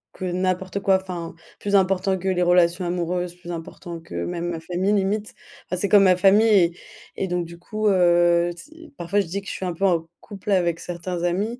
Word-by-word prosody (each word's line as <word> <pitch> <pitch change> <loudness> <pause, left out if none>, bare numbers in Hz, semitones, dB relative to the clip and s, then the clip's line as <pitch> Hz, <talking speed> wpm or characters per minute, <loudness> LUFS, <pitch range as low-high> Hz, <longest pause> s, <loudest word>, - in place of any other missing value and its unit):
que 185 - -5
n'importe 185 +1 -1
quoi, 195 -1 +4
enfin, 175 -3 -6 0.3
plus 205 0 0
important 190 0 +2
que 190 - -5
les 180 -1 +1
relations 175 0 +3
amoureuses, 175 0 -2
plus 175 -1 -12
important 170 0 -7
que 165 - -14
même 175 0 -3
ma 170 -2 -4
famille, 180 +4 -1
limite. 205 +1 -1 0.3
Enfin, 180 - -3
c'est 200 - 0
comme 205 0 +7
ma 185 -1 +5
famille 200 +4 +5
et 175 -3 +4 0.4
et 195 - -2
donc 175 -1 -1
du 170 +1 -11
coup, 215 +5 -3
heu, 175 -2 +4
ts 320 - -13
parfois 175 +4 0
je - - -4
dis 195 +4 -4
que 195 - -15
je - - -4
suis 190 - -5
un 180 - -2
peu 195 +4 -1
en 170 -3 +1
couple 205 0 -7
avec 170 -3 +2
certains 175 0 -5
amis, 200 +8 -1
180 Hz, 215 wpm, -23 LUFS, 175-195 Hz, 0.4 s, comme